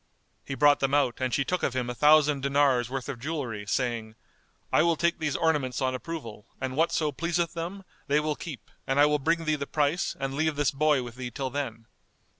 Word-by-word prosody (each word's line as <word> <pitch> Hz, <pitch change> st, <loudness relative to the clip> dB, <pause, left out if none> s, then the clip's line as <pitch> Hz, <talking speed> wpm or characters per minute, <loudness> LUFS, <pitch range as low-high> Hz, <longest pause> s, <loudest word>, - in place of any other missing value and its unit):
He 135 Hz, -, -5 dB
brought 145 Hz, +2 st, +5 dB
them 135 Hz, +1 st, +1 dB
out 135 Hz, -4 st, +1 dB
and 130 Hz, -1 st, 0 dB
she 140 Hz, -, +1 dB
took 180 Hz, +5 st, -1 dB
of 130 Hz, -, -1 dB
him 125 Hz, -1 st, -1 dB
a 125 Hz, -, -3 dB
thousand 150 Hz, +1 st, +4 dB
dinars' 140 Hz, -3 st, +2 dB
worth 130 Hz, -1 st, -4 dB
of 120 Hz, -, -5 dB
jewellery, 125 Hz, -8 st, -4 dB
saying, 115 Hz, -2 st, -2 dB, 0.6 s
"I -, -, +6 dB
will 170 Hz, 0 st, +3 dB
take 170 Hz, +2 st, 0 dB
these 150 Hz, -2 st, -1 dB
ornaments 150 Hz, -6 st, +1 dB
on 130 Hz, -1 st, 0 dB
approval; 125 Hz, -7 st, -7 dB
and 130 Hz, 0 st, -3 dB
whatso 155 Hz, -1 st, +1 dB
pleaseth 170 Hz, +3 st, -1 dB
them, 175 Hz, +4 st, -5 dB, 0.2 s
they 145 Hz, +1 st, +3 dB
will 150 Hz, 0 st, -1 dB
keep 150 Hz, -5 st, -9 dB, 0.2 s
and 135 Hz, +1 st, +1 dB
I 145 Hz, -, +8 dB
will 150 Hz, 0 st, +2 dB
bring 165 Hz, +3 st, 0 dB
thee 155 Hz, -, +2 dB
the 140 Hz, -2 st, -3 dB
price 150 Hz, +4 st, 0 dB
and 135 Hz, 0 st, -2 dB
leave 155 Hz, +2 st, 0 dB
this 145 Hz, -1 st, +1 dB
boy 145 Hz, -1 st, +2 dB
with 120 Hz, 0 st, -9 dB
thee 125 Hz, -1 st, -4 dB
till 130 Hz, +1 st, -4 dB
then." 120 Hz, -5 st, -4 dB
140 Hz, 220 wpm, -27 LUFS, 130-155 Hz, 0.6 s, I